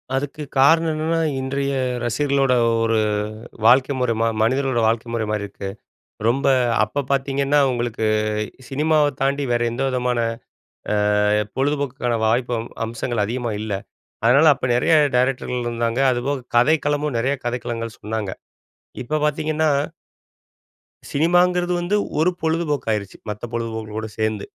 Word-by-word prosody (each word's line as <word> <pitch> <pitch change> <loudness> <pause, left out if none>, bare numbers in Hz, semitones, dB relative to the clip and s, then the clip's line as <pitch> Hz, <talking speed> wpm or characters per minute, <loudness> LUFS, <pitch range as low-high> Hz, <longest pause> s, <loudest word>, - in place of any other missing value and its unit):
அதுக்கு 145 +2 -3 0.2
காரணம் 160 +4 +5
என்னன்னா, 160 +2 0 0.2
இன்றைய 140 +1 -2 0.3
ரசிகர்களோட 135 +2 +1 0.3
ஒரு 115 0 +2 0.7
வாழ்க்கை 130 +4 +5
முறை 125 -2 +1
ம - - +3 0.2
மனிதர்களோட 130 +2 +1
வாழ்க்கை 115 +1 0
முறை 115 -2 -1
மாறி 105 -1 -1
இருக்கு. 100 -1 -7 0.6
ரொம்ப 135 +4 +1 0.4
அப்ப 140 +7 -3
பாத்தீங்கன்னா, 140 +1 +1
உங்களுக்கு 120 -2 -2 0.6
சினிமாவ 150 +1 +2
தாண்டி 140 +1 +1
வேற 120 0 +1
எந்தவிதமான 125 -1 -1 0.8
அ - - +2 0.6
பொழுதுபோக்குக்கான 135 -3 -1
வாய்ப்பு 120 +2 +1
அம் 115 - -7 0.2
அம்சங்கள் 115 0 -2
அதிகமா 120 +1 -3
இல்ல. 110 -1 -3 0.5
அதுனால 140 +7 +6
அப்ப 135 - -4
நெறைய 140 +6 +3 0.2
டைரக்டர்கள் 125 -1 0
இருந்தாங்க, 115 +1 -1
அதுபோக 130 +1 -2
கதைக்களமும் 145 +2 +2
நெறைய 130 +5 +1
கதைக்களங்கள் 115 -2 -4
சொன்னாங்க. 105 -2 -3 0.7
இப்ப 155 +5 -1
பாத்தீங்கன்னா 155 +1 0 1.4
சினிமாங்கிறது 175 +3 +2
வந்து 175 +4 0 0.2
ஒரு 170 +4 +3
பொழுதுபோக்கு 160 -5 -1
ஆயிருச்சு, 100 -3 -3
மத்த 105 +1 -6
பொழுதுபோக்குகளோட 110 -2 -4
சேந்து. 110 -2 -1
130 Hz, 120 wpm, -21 LUFS, 115-145 Hz, 1.4 s, அதுனால